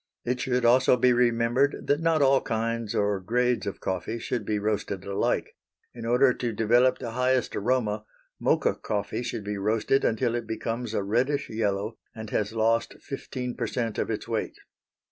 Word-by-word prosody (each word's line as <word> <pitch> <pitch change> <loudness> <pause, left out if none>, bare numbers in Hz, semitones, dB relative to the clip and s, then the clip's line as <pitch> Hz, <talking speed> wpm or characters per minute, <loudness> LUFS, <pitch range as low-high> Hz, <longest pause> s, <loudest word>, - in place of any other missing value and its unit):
It 125 +1 -1
should 125 -2 0
also 125 +1 +5
be 125 +1 +4
remembered 120 +3 +2
that 145 - +2
not 165 -2 +2
all 135 0 +4
kinds 115 -1 -2
or 100 -1 +1
grades 120 +3 0
of 100 - -4
coffee 95 +5 -3
should 115 -2 -3
be 105 - +1
roasted 100 -2 -2
alike. 100 0 -1 0.4
In 115 -1 -6
order 125 +2 +4
to 120 -1 -3
develop 120 +4 +3
the 120 -3 -5
highest 125 +1 +1
aroma, 110 -2 0 0.3
Mocha - - +2
coffee 105 +2 -3
should 115 - -4
be 100 0 -4
roasted 110 +6 +1
until 115 +1 +1
it 120 -1 -3
becomes 115 +1 -3
a 100 - 0
reddish 130 +8 0
yellow, 105 -1 -1 0.2
and 110 -1 -7
has 105 0 0
lost 115 +1 +1
15 125 -2 -5
per - - -3
cent 115 -3 -2
of - - -1
its - - -3
weight. - - -2
115 Hz, 175 wpm, -27 LUFS, 105-125 Hz, 0.4 s, also